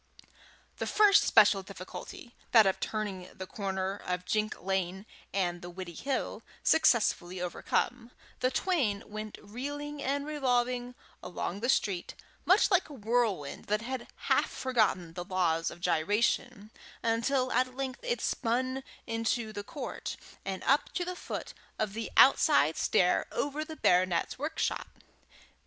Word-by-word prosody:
The - - -3
first 420 -1 +6
special 195 - +6
difficulty, 195 +5 -9 0.2
that 225 -3 +8
of 190 - +1
turning 200 -4 -3
the 185 - -6
corner 195 -1 -3
of 180 -2 -4
Jink 215 +1 -1
Lane 190 +1 -2 0.3
and 175 -3 -1
the 175 - -7
Widdiehill, 185 - -4 0.2
successfully 215 - +3
overcome, 230 +6 -1 0.3
the 255 - +2
twain 260 - 0
went 215 0 -7
reeling 290 +6 -6
and 280 +1 -1
revolving 250 -4 0 0.3
along 180 +1 -4
the 240 +4 -1
street, 195 -8 0 0.3
much 385 +4 +5
like 375 -3 +3
a - - -9
whirlwind 220 - -1
that 210 +1 0
had 255 +1 -4
half - - +1
forgotten 215 -10 0
the 175 0 -5
laws 175 -3 +1
of 175 - -11
gyration, 205 +6 0 0.3
until 255 +3 +1
at 255 0 +1
length 265 -1 -4
it - - -2
spun 255 +3 -1 0.2
into 225 0 -1
the 205 0 -5
court, 260 +5 -6 0.3
and 190 -1 -4
up 280 +2 +2
to 355 - -1
the 365 0 -4
foot - - -6 0.2
of 215 -2 -1
the 225 +1 -4
outside - - +6
stair - - +2
over 290 +2 -1
the 315 0 -8
baronet's 180 - +2
workshop. 310 +3 -2
225 Hz, 140 wpm, -30 LUFS, 190-260 Hz, 0.3 s, that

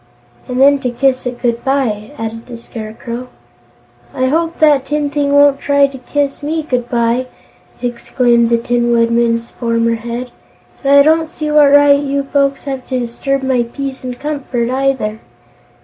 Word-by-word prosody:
"And 250 -1 -3
then 280 +1 +5
to 255 - -2
kiss 255 +1 0
it 245 -1 -5
good 235 -1 0
bye," 245 -6 -1
added 225 0 -6
the 240 -2 -8
Scarecrow. 235 +2 -7 0.9
"I 260 - 0
hope 330 +3 -1
that 295 -4 +3
tin 295 -1 -1
thing 285 -1 0
won't 285 -1 +5
try 285 0 +3
to 275 -1 -6
kiss 280 +2 -2
me 315 +2 -2
good 250 -5 -2
bye!" 240 +1 0 0.6
exclaimed 240 -1 +1
the 235 - +3
Tin 240 0 0
Woodman's 235 0 +1
former 230 -1 0
head. 235 +2 -5 0.5
"And 275 - +2
I 280 0 +7
don't 320 +2 +3
see 305 -2 -4
what 295 -2 +5
right 285 0 +6
you 280 0 -1
folks 275 0 0
have 270 -3 -5
to 255 - -2
disturb 265 +3 -2
my 260 -2 +1
peace 265 +3 -5
and 250 -1 -5
comfort, 270 -5 -3
either." 260 -5 -1
260 Hz, 165 wpm, -15 LUFS, 235-280 Hz, 0.9 s, I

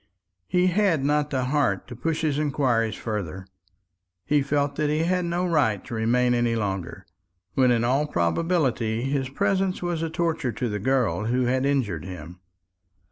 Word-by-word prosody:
He 180 - +2
had 180 -6 +2
not 150 0 +1
the 130 -3 -1
heart 130 -8 0
to 120 - -8
push 160 +6 -2
his 150 -2 0
inquiries 130 -7 +1
farther. 95 -5 -4 0.8
He 150 -1 +3
felt 145 0 0
that 150 -1 +1
he 155 +2 +1
had 180 +1 +1
no 175 +1 -1
right 145 - +1
to - - -8
remain 125 +2 +2
any 120 -1 +1
longer, 95 -6 -3 0.5
when 130 -1 +3
in 120 -1 +2
all 135 +5 +1
probability 120 - 0
his 135 -1 -1
presence 190 +6 0
was 175 -2 -1
a 165 - -1
torture 160 -5 -1
to 125 - -2
the 105 0 -3
girl 125 -2 +1
who 125 +3 +1
had 130 +2 +1
injured 110 - 0
him. 90 -1 -9
135 Hz, 170 wpm, -25 LUFS, 115-155 Hz, 0.8 s, He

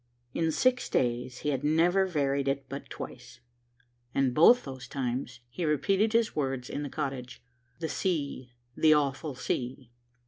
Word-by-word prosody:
In 165 -1 +1
six 250 +9 +2
days 125 0 -1
he 150 - -1
had 135 -1 -1
never 175 +5 +3
varied 140 -5 0
it 135 0 0
but 140 +1 -7
twice, 120 - -9 0.8
and 135 -2 +2
both 235 - +7
those 130 -2 -8
times 125 -2 -3
he 125 +9 -5
repeated 195 - +2
his 230 -1 +2
words 135 -4 -2
in 145 - -3
the 145 - -4
cottage, 135 -4 -5 0.4
"The 165 - -2
sea, 145 -9 -2 0.2
the 155 -1 +5
awful 145 0 -1
sea." 125 0 -3
140 Hz, 150 wpm, -29 LUFS, 130-160 Hz, 0.8 s, both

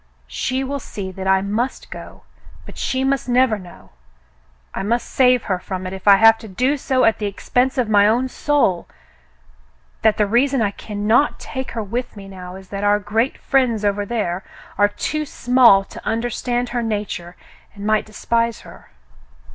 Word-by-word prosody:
She 260 - -2
will 280 +1 -3
see 195 -6 -7
that 190 +1 -6
I 190 0 +4
must 225 +6 -3
go, - - -10 0.4
but - - -11
she 260 0 -1
must 270 -1 0
never 245 -3 +3
know 180 -2 -14 0.4
— - - -37
I - - -3
must 230 +5 0
save 250 -2 +3
her 185 -3 -1
from 185 0 -6
it 185 - -5
if 190 +1 -9
I 200 - +9
have 225 +2 +6
to 220 - -10
do 250 +9 0
so 260 -2 0
at 225 - +2
the 210 - -1
expense 250 +6 0
of 250 -3 +1
my 205 -1 +5
own 240 +4 +2
soul 260 - 0 0.6
— - - -34
that 220 -1 +3
the 210 - +3
reason 255 +6 +2
I 210 -3 +1
cannot 215 +7 0
take 260 0 -6
her 225 -2 -3
with 235 +3 -4
me 195 -1 -9
now 185 -1 -9
is 190 -1 -12
that 200 0 -5
our 205 0 +4
great 220 +5 -1
friends 245 -6 +1
over 205 0 +1
there 200 -5 -2 0.3
are 205 - +4
too 305 +8 -3
small 245 -7 +4
to - - -12
understand 240 +1 -2
her 240 0 -2
nature 205 -6 -4 0.4
and 200 0 -8
might 215 0 +1
despise 230 +1 -1
her. - - -15
215 Hz, 185 wpm, -20 LUFS, 195-250 Hz, 0.6 s, I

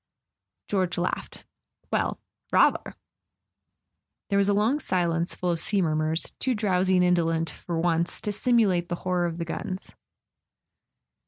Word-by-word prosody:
George 185 -3 0
laughed. 175 +1 -3 0.2
" - - -44
Well—rather! - - 0 0.6
" - - -57
There 200 - +3
was 200 0 +2
a - - +4
long 225 +8 +2
silence 170 - -1
full 180 -1 -1
of 170 - -1
sea 200 +4 +1
murmurs, 155 -1 +1
too 260 -2 0
drowsy 190 -3 +2
and 180 0 +4
indolent, 165 -2 +1
for 170 +1 -5
once, 170 0 0
to 210 - -2
simulate 205 -6 +2
the 175 - -1
horror 180 -1 +1
of 165 -1 -5
the 170 - -3
guns. 185 +3 -5
180 Hz, 145 wpm, -26 LUFS, 170-200 Hz, 0.6 s, a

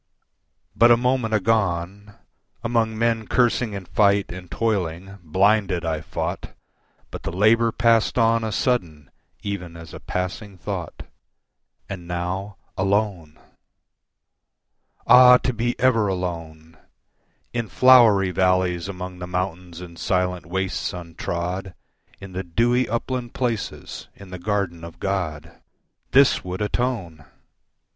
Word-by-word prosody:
But 120 - +6
a 120 - +7
moment 125 -2 0
agone, 100 -2 -1 0.5
Among 115 -2 0
men 115 -1 0
cursing 120 -2 +1
in 100 -2 -6
fight 100 +1 +2
and 90 -1 -9
toiling, 95 -2 -2
blinded 95 +1 +1
I 80 -2 -1
fought, 80 - -5 0.6
But - - -7
the - - -4
labour 110 +5 +3
passed 115 0 +2
on 115 -1 +3
a 110 - -2
sudden 85 - -1 0.3
even 90 -5 -5
as 80 -1 -11
a - - -8
passing 95 +2 -5
thought, 90 -3 -6 0.8
And 90 -3 -7
now 90 +3 -4 0.2
alone! 95 -5 -1 1.7
Ah, 125 0 +8
to 125 - -2
be 120 +2 -2
ever 115 -4 +3
alone, 85 -4 -5 0.8
In 120 -2 -2
flowery 115 -8 +6
valleys 90 0 +1
among 90 -1 -7
the 90 - -6
mountains 90 -1 -4
and 85 -2 -11
silent 90 -1 -1
wastes 95 +1 -2
untrod, 90 +2 -5 0.4
In 100 -1 -10
the 95 +1 -4
dewy 120 +8 +1
upland 120 +1 -3
places, 120 -4 -4
in 100 -2 -13
the 90 - -7
garden 90 -3 -2
of 85 0 -10
God, 90 -6 -4 0.5
This 135 0 +4
would 90 +3 -4
atone! 105 -9 -2
95 Hz, 120 wpm, -23 LUFS, 90-115 Hz, 1.7 s, Ah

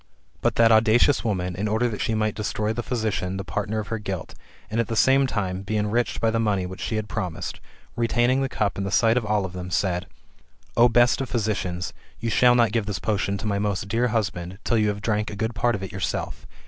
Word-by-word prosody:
But - - +1
that 115 -1 +5
audacious 115 +5 +4
woman, 90 -5 -1
in 100 +4 -2
order 110 +3 +1
that 110 -4 -4
she 110 - 0
might 110 -1 0
destroy 105 0 -2
[the 120 - -2
physician] 110 -6 -2
the 95 - -4
partner 105 +2 -3
of 105 - -5
her 115 - -2
guilt, 95 -5 -5 0.4
and, 110 - 0
at 115 - +1
the 115 - -3
same 135 +3 +4
time, 95 -6 -2
be 105 +2 -2
enriched 105 +3 0
/by 115 - +2
the 115 - 0
money 100 -4 +1
which 95 +1 -8
she 110 - -2
had 110 -1 -2
promised, 90 -7 -4 0.4
retaining 120 +3 +2
the 135 - 0
cup 105 -5 -1
in - - -1
the 100 - -2
sight 115 +3 +3
of 125 - +1
all 105 -2 +1
of 90 - -7
them, 90 0 -6
said, 90 -1 0 0.7
"O 120 +1 +6
best 120 +3 +4
of 135 - -4
physicians, 100 -6 -2 0.3
you 115 0 -2
shall 125 +1 +5
not 115 -3 +4
give 110 -2 -1
this 105 -3 -2
potion 100 +3 -1
to 105 - -7
my 100 -1 0
most 100 -1 -1
dear 115 +4 +1
husband, 95 -5 -2
till 115 - +2
you 105 - +2
have 105 0 -2
drank 105 -1 0
a - - -6
good 110 +3 -2
part 120 +3 +1
of 100 - -5
it 95 - -6
yourself. 95 -1 -4
105 Hz, 240 wpm, -24 LUFS, 100-115 Hz, 0.7 s, O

